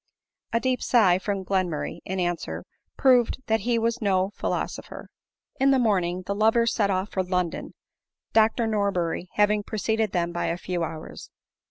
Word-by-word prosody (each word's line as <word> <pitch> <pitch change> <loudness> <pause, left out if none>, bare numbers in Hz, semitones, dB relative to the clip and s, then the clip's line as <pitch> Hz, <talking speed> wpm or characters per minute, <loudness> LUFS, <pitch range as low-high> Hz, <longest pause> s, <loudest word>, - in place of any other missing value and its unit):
A 230 - +2
deep 255 +1 0
sigh 190 -7 +4
from 195 -1 -3
Glenmurray, 180 -5 -1
in 190 +1 -3
answer, 175 -1 -2 0.3
proved 250 -4 +4
that 220 -1 +1
he 240 0 0
was 230 +2 0
no 190 -2 +1
philosopher. - - -4 0.5
Iu 270 +1 +4
the 270 - +5
morning 185 -6 +1
the 200 - -1
lovers 225 +3 +3
set 205 -3 +1
off 190 +1 -1
for 190 - 0
London, 180 -2 -2 0.6
Dr 225 +1 +3
Nor 205 -2 +1
berry 175 0 -2
having 210 0 +3
preceded 220 0 -1
them 175 -1 0
by 175 0 -2
a 170 - -1
few 180 -1 -3
hours. 160 -1 -7
200 Hz, 165 wpm, -25 LUFS, 180-225 Hz, 0.6 s, the